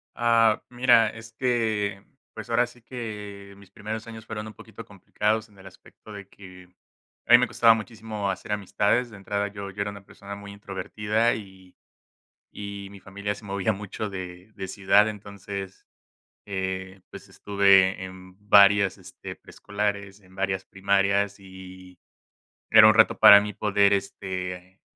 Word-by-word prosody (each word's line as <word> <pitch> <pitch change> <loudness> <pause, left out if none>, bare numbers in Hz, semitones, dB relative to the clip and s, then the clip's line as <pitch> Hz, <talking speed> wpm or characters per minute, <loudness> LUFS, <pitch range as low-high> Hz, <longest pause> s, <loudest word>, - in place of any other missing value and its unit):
Ah, 115 -2 +3
mira, 120 -2 +4
es 115 0 -12
que, 110 -5 -1 0.3
pues, - - -8
ahora 120 +1 +2
sí 120 -1 -19
que 105 -5 -8
mis 100 -1 -18
primeros 110 +2 -6
años 110 -1 -11
fueron 105 0 -6
un 110 - -10
poquito - - -12
complicados 110 +1 -2
en 100 - -23
el 95 - -16
aspecto 95 +3 -16
de 100 -1 -10
que 90 -2 -15 0.6
a - - -3
mí 120 - +10
me 125 - +1
costaba 115 -1 +5
muchísimo 110 -2 -5
hacer 95 +2 -5
amistades. 105 +4 0
De 105 - -12
entrada, 100 +1 -3
yo 100 -1 -8
yo 100 +2 -6
era 100 - -2
una 100 -1 -13
persona 100 0 -10
muy 100 0 -10
introvertida 105 +3 -2
y 95 -3 -12 0.8
y 100 -1 -8
mi 100 - -12
familia 100 +2 -5
se 105 - -14
movía 100 +1 -1
mucho 105 +1 -6
de 90 0 -9
de 95 - -7
ciudad, 100 +1 +3
entonces, 100 -1 -9 0.6
eh, 95 -1 -5
pues, - - -12
estuve 100 -2 +3
en 95 0 -11
varias, 100 -1 +6
este, - - -11
preescolares, 100 -1 -5
en 95 -2 -21
varias 95 -1 -2
primarias 100 +1 0
y 95 -1 -13 0.7
era 110 -1 +9
un 110 - +6
reto 110 0 +4
para 105 -2 +9
mí 105 0 -5
poder, 100 -1 +2
este, 95 -1 -5
100 Hz, 155 wpm, -25 LUFS, 95-110 Hz, 0.8 s, mí